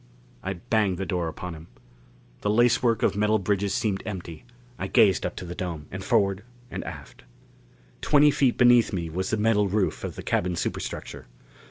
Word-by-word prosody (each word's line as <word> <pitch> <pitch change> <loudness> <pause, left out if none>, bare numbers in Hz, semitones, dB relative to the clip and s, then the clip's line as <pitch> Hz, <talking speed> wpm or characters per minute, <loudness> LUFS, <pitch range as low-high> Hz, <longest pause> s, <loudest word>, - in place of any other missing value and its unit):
I 95 - -3
banged 95 +1 0
the 95 - -3
door 90 -4 -1
upon 90 +2 -6
him. 80 +1 -11 0.7
The 105 - -1
lacework 120 +1 +3
of - - +2
metal 105 +1 +2
bridges 100 0 0
seemed 100 -3 -1
empty. 90 -3 -7 0.3
I 95 - -2
gazed 95 -1 +4
up - - -8
to 90 - -7
the 85 - -6
dome, 85 -5 -5
and 95 +1 -6
forward 100 -3 +1 0.3
and - - -4
aft. - - -9 0.8
Twenty 150 0 +5
feet 135 -3 +2
beneath 120 -2 +5
me 85 -4 -3
was 95 +3 -2
the 110 - 0
metal 105 -1 +2
roof 100 0 -1
of - - -5
the - - -7
cabin 90 0 0
superstructure. 80 - -5
100 Hz, 180 wpm, -26 LUFS, 90-110 Hz, 0.8 s, Twenty